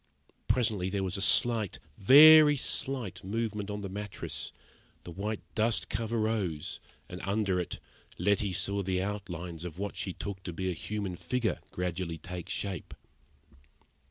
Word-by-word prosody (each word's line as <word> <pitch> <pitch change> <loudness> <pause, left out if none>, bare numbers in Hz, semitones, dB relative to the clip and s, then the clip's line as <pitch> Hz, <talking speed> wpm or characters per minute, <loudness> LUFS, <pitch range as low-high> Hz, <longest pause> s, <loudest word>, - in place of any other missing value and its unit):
Presently 110 -7 +1
there 100 0 -1
was 95 -1 -2
a 100 - -3
slight, 110 -1 +2 0.2
very 150 +6 +9
slight 130 -6 -2
movement 105 0 -2
on 105 0 -4
the 100 - -4
mattress, 105 +1 -5 0.5
the 90 - -8
white 105 +5 -3
dust 110 0 +1
cover 115 0 -2
rose, 105 -9 -1 0.3
and, 90 +1 -7
under 100 -2 0
it, 90 - -4 0.4
Letty 100 -1 +1
saw 100 +2 0
the 95 -1 -1
outlines 90 -4 -4
of 85 -2 -7
what 100 +1 -4
she 95 - -3
took 100 0 -6
to 90 -3 -6
be 95 +2 -2
a - - -2
human 100 +1 -4
figure, 125 +1 -1
gradually 90 -2 -3
take 90 +2 -7
shape. 100 -3 -4
100 Hz, 150 wpm, -30 LUFS, 90-110 Hz, 0.5 s, very